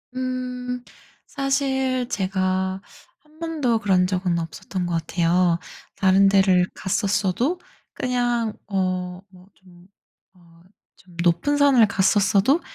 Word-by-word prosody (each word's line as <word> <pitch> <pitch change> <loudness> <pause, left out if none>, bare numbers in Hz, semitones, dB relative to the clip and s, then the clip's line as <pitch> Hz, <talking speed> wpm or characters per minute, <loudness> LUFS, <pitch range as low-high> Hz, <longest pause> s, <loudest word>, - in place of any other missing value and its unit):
음. 250 -1 -4 0.4
사실 265 -2 -1
제가 190 -1 -1 0.4
한 305 +2 -25
번도 300 -9 0
그런 185 -3 +2
적은 180 -2 -1
없었던 170 +3 -5
것 175 - -3
같아요. 170 +1 +1 0.4
다른 195 +1 +4
데를 190 -2 +4
갔었어도 200 - -1 0.3
그냥 240 -3 -1
어 185 -2 -2
뭐 185 0 -18
좀 180 -1 -19 0.5
어 170 -2 -22 0.4
좀 180 -1 -20
높은 175 +13 +2
산을 270 -6 +5
갔었어도 205 - +2
195 Hz, 200 characters per minute, -23 LUFS, 180-250 Hz, 0.5 s, 산을